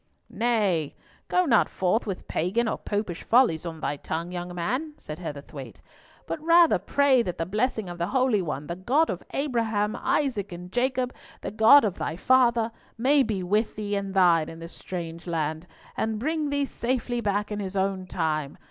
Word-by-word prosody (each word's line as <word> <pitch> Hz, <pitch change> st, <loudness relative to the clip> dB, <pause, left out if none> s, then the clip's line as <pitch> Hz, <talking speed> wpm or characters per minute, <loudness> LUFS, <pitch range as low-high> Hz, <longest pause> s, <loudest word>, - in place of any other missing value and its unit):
"Nay, 205 Hz, -10 st, +1 dB, 0.3 s
go 365 Hz, 0 st, +2 dB
not 245 Hz, -8 st, +4 dB
forth 190 Hz, +5 st, 0 dB
with 195 Hz, -3 st, -5 dB
Pagan 195 Hz, +9 st, 0 dB
nor 220 Hz, -, -2 dB
Popish 205 Hz, -4 st, -3 dB
follies 225 Hz, -10 st, +3 dB
on 165 Hz, -1 st, -6 dB
thy 145 Hz, -, -2 dB
tongue, 165 Hz, +4 st, -4 dB
young 175 Hz, 0 st, -5 dB
man," 255 Hz, -, -2 dB
said 150 Hz, +2 st, -8 dB
Heatherthwayte, 145 Hz, -4 st, -8 dB, 0.5 s
"but 315 Hz, -, -4 dB
rather 335 Hz, +1 st, +5 dB
pray 280 Hz, -3 st, +3 dB
that 180 Hz, -6 st, -4 dB
the 165 Hz, -, -1 dB
blessing 215 Hz, +2 st, -1 dB
of 175 Hz, 0 st, -7 dB
the 170 Hz, -, 0 dB
Holy 255 Hz, -6 st, +2 dB
One, 150 Hz, -4 st, -4 dB
the 170 Hz, -, -4 dB
God 265 Hz, -, +2 dB
of 180 Hz, -, -5 dB
Abraham, 225 Hz, -6 st, 0 dB
Isaac, 230 Hz, -10 st, 0 dB
and 180 Hz, +1 st, -8 dB
Jacob, 255 Hz, +1 st, 0 dB, 0.3 s
the -, -, -4 dB
God 220 Hz, +6 st, +7 dB
of 195 Hz, -4 st, -2 dB
thy 160 Hz, -, -2 dB
father, 235 Hz, +1 st, +3 dB, 0.3 s
may 275 Hz, +5 st, +4 dB
be 215 Hz, -7 st, -1 dB
with 210 Hz, +5 st, 0 dB
thee 205 Hz, -1 st, -2 dB
and 195 Hz, -1 st, -3 dB
thine 170 Hz, -4 st, +4 dB
in 165 Hz, -, -9 dB
this 165 Hz, +1 st, -9 dB
strange 170 Hz, -1 st, -7 dB
land, 160 Hz, 0 st, -2 dB, 0.3 s
and 220 Hz, -1 st, -1 dB
bring 305 Hz, +5 st, -1 dB
thee 285 Hz, 0 st, 0 dB
safely 245 Hz, -1 st, -2 dB
back 205 Hz, 0 st, -1 dB
in 210 Hz, -, -3 dB
His 195 Hz, -1 st, -5 dB
own 190 Hz, -1 st, -1 dB
time. 155 Hz, -5 st, -2 dB
205 Hz, 185 wpm, -26 LUFS, 175-245 Hz, 0.5 s, God